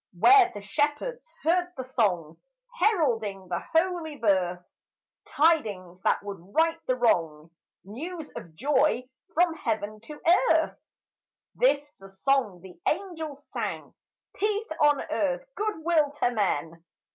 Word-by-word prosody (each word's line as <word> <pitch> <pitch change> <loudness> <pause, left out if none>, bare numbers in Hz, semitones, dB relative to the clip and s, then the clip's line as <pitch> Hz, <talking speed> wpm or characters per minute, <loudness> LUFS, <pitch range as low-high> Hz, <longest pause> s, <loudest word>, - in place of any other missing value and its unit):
Where 375 - +7
the 205 - -8
shepherds 300 - -2
heard 355 +2 +1
the 260 - -3
song 195 -11 0 0.4
Heralding 225 - +1
the 175 - -1 0.2
holy 330 -3 +1
birth, 180 -6 +1 0.6
Tidings 215 - +1
that - - +1
would 200 -1 -6 0.2
right 330 +1 +3
the 255 - +2
wrong, 165 -10 +1 0.3
News 310 - -7
of 160 -2 -9
joy 270 - +2 0.3
from 345 0 +4
heaven 215 -7 -3
to 295 +7 -11 0.3
earth. - - +2 0.7
This 295 -13 +2
the 195 0 -13
song 205 -2 0
the 180 -3 -13
angels 320 -5 -3
sang: - - -4 0.4
"Peace 420 0 -1
on 295 -1 +4
earth, - - 0
good 420 -6 -3
will 320 -4 +3
to 245 -4 0
men." 165 -7 -1
275 Hz, 125 wpm, -27 LUFS, -, 0.7 s, Where